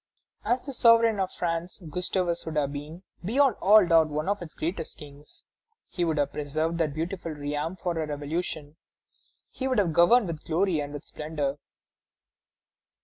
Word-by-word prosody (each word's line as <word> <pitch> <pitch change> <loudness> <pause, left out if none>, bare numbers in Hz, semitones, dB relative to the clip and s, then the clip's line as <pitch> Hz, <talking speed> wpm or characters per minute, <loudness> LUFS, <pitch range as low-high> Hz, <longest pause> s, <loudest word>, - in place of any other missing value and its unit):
"As 245 +1 0
the 275 - -6
sovereign 230 -3 +5
of 190 -1 -1
France, 170 +1 -3
Gustavus 180 +1 -1
would 160 - -4
have 145 -2 0
been, 150 +5 -8 0.2
beyond 260 +5 +3
all 205 0 +7
doubt, 165 -2 +4
one 150 +2 -2
of 205 -1 0
its 165 -3 -9
greatest 165 0 -4
kings. 145 0 -14 0.4
He 175 - -2
would 160 -2 0
have 145 -1 +1
preserved 155 +3 -2
that 155 -3 0
beautiful 170 0 -3
realm 150 +3 -3
from 175 -2 -3
a 160 -1 -1
revolution; 150 +1 -4 0.7
he 265 - -3
would 255 -2 0
have 185 -6 +2
governed 200 +8 +5
with 165 -4 -5
glory 170 0 +1
and 145 -1 -4
with 145 -1 -8
splendor.... 150 -2 -3
165 Hz, 165 wpm, -27 LUFS, 150-185 Hz, 0.7 s, all